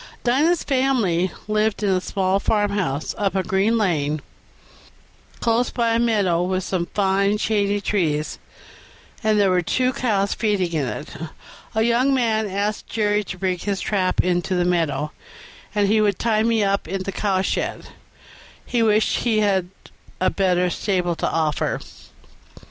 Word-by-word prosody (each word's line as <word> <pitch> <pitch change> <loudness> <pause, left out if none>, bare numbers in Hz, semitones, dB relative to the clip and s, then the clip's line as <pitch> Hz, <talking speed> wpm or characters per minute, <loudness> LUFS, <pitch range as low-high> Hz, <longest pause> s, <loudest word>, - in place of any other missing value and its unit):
Dinah's 300 +8 +2
family 235 - +1 0.2
lived 215 0 0
in 205 - +2
a 185 -1 +1
small 190 0 0
farmhouse, 200 -9 0
up 195 -2 0
a 190 - +1
green 195 +5 +1
lane, 155 -8 0 1.2
close 235 +1 +2
by 235 -2 0
a 230 - +2
meadow 205 -7 +2
with 185 +1 -1
some 175 -2 -2
fine 200 +1 +1
shady 205 -1 +1
trees; 160 -7 -1 0.8
there 210 -4 +3
were 180 -1 +3
two 255 +9 0
cows 200 -6 0
feeding 200 -6 0
in 150 -5 0
it. 120 +6 -6 0.6
A 220 - +3
young 245 +4 +3
man 220 -4 +1
asked 200 +2 -2
Jerry 210 -1 0
to 185 - -6
bring 185 -1 -1
his 200 +1 -2
trap 190 -3 +1
into 180 +1 0
the 175 0 +1
meadow, 165 -4 0 0.6
and 205 -1 +3
he 215 +2 +3
would 205 -3 +2
tie 220 -2 +1
me 225 -1 +2
up 195 -2 0
in 190 +2 -3
the 195 - -4
cowshed; 195 -2 -1 0.8
he 240 -2 0
wished 215 -1 +3
he 220 -3 +1
had 190 -4 +1 0.5
a 185 - +2
better 180 -2 +1
stable 180 -4 -1
to - - -1
offer. 155 -2 0
200 Hz, 150 wpm, -22 LUFS, 180-220 Hz, 1.2 s, there